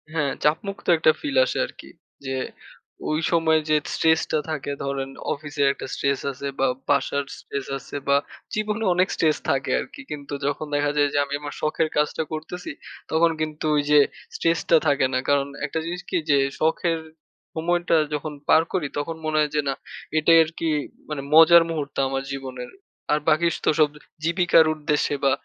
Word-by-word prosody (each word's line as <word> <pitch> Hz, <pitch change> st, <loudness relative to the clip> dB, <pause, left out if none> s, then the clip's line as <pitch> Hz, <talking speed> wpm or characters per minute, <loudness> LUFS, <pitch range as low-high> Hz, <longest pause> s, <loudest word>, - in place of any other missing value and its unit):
হ্যাঁ, 150 Hz, -4 st, 0 dB
চাপমুক্ত 175 Hz, +5 st, 0 dB
একটা 155 Hz, -, +5 dB
ফিল 285 Hz, -2 st, -3 dB
আসে -, -, -3 dB
আরকি। -, -, -12 dB, 0.4 s
যে 135 Hz, 0 st, -2 dB, 0.7 s
ঐ -, -, 0 dB, 0.2 s
সময় 160 Hz, -2 st, +3 dB
যে 155 Hz, -, +4 dB, 0.2 s
স্ট্রেস 160 Hz, 0 st, +3 dB
টা 155 Hz, -, +2 dB
থাকে 145 Hz, -2 st, -3 dB
ধরেন 140 Hz, -1 st, -3 dB, 0.2 s
অফিসের 145 Hz, -1 st, -1 dB
একটা -, -, -8 dB
স্ট্রেস 140 Hz, -1 st, 0 dB
আছে 140 Hz, +1 st, -6 dB
বা 135 Hz, -, +3 dB, 0.2 s
বাসার 140 Hz, 0 st, +1 dB, 0.2 s
স্ট্রেস 140 Hz, -1 st, -5 dB
আছে 135 Hz, -, -11 dB
বা 140 Hz, 0 st, +5 dB, 0.4 s
জীবনে 215 Hz, +1 st, -1 dB
অনেক 185 Hz, +1 st, +3 dB
স্ট্রেস 155 Hz, -2 st, +2 dB
থাকে 135 Hz, -, 0 dB
আরকি। 295 Hz, -, -8 dB
কিন্তু 145 Hz, -1 st, -6 dB
যখন 145 Hz, +2 st, -1 dB
দেখা 145 Hz, 0 st, +1 dB
যায় 145 Hz, 0 st, +4 dB
যে -, -, +1 dB
আমি 140 Hz, -, -7 dB
আমার 145 Hz, 0 st, -6 dB
শখের 155 Hz, +1 st, 0 dB
কাজটা 150 Hz, +2 st, +1 dB
করতেছি, 160 Hz, +3 st, -6 dB, 0.4 s
তখন 165 Hz, +1 st, +4 dB
কিন্তু 155 Hz, 0 st, -3 dB
ওই 145 Hz, -, +3 dB
যে 150 Hz, -, +8 dB, 0.4 s
স্ট্রেস 165 Hz, -1 st, +1 dB
টা 165 Hz, -, +7 dB
থাকে 140 Hz, -2 st, +3 dB
না। 130 Hz, -, +2 dB
কারণ 140 Hz, -1 st, +3 dB, 0.2 s
১ -, -, -5 dB
টা -, -, +2 dB
জিনিস 175 Hz, +2 st, -4 dB
কি, -, -, +1 dB
যে 145 Hz, -, +5 dB, 0.2 s
শখের 165 Hz, +1 st, +1 dB, 0.6 s
সময়টা 175 Hz, +1 st, +1 dB, 0.2 s
যখন 150 Hz, +1 st, -3 dB, 0.2 s
পার 160 Hz, -, +7 dB
করি 180 Hz, -6 st, 0 dB
তখন 155 Hz, +3 st, -2 dB
মনে 155 Hz, 0 st, 0 dB
হয় 150 Hz, -1 st, +1 dB
যে 150 Hz, -, +3 dB
না, -, -, +1 dB, 0.4 s
এটাই 165 Hz, +2 st, +6 dB
আরকি 165 Hz, +1 st, -3 dB, 0.4 s
মানে 150 Hz, -2 st, -3 dB
মজার 165 Hz, +2 st, +8 dB
মুহূর্ত 150 Hz, -4 st, -4 dB
আমার 135 Hz, 0 st, -2 dB
জীবনের। 130 Hz, -2 st, -6 dB, 0.4 s
আর 150 Hz, -, +3 dB
বাকি 165 Hz, +2 st, +3 dB
তো -, -, +4 dB
সব 150 Hz, -1 st, +5 dB, 0.3 s
জীবিকার 170 Hz, -1 st, +4 dB
উদ্দেশ্যে 150 Hz, -1 st, 0 dB
বা 135 Hz, -, +5 dB
155 Hz, 180 wpm, -24 LUFS, 140-165 Hz, 0.7 s, যে